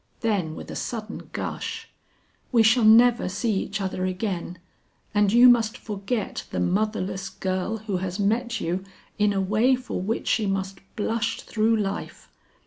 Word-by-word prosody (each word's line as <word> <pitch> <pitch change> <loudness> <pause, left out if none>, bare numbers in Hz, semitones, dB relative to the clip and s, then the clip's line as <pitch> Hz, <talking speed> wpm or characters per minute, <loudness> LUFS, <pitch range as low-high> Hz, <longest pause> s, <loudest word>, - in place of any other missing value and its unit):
Then 195 -9 0
with - - -8
a - - -6
sudden 220 -2 -5
gush, - - -4 0.6
"We 235 -3 +5
shall 225 +2 +4
never 230 -1 +6
see 210 +4 -1
each 200 - -4
other 190 -1 -2
again, 185 -2 -3 0.6
and 205 -1 +3
you 240 +3 +8
must 230 -2 +4
forget 210 +1 -4
the - - -3
motherless 195 0 -1
girl 190 +3 -2
who 205 -3 -3
has 180 0 -3
met 230 +3 0
you 180 +3 -2 0.4
in 210 0 +4
a 195 - 0
way 215 +7 +3
for 255 -6 -5
which 215 +5 -2
she 215 -3 +2
must 195 0 -2 0.2
blush 225 +1 -1
through 225 +1 +1
life. 200 -2 -4
210 Hz, 155 wpm, -25 LUFS, 190-225 Hz, 0.6 s, you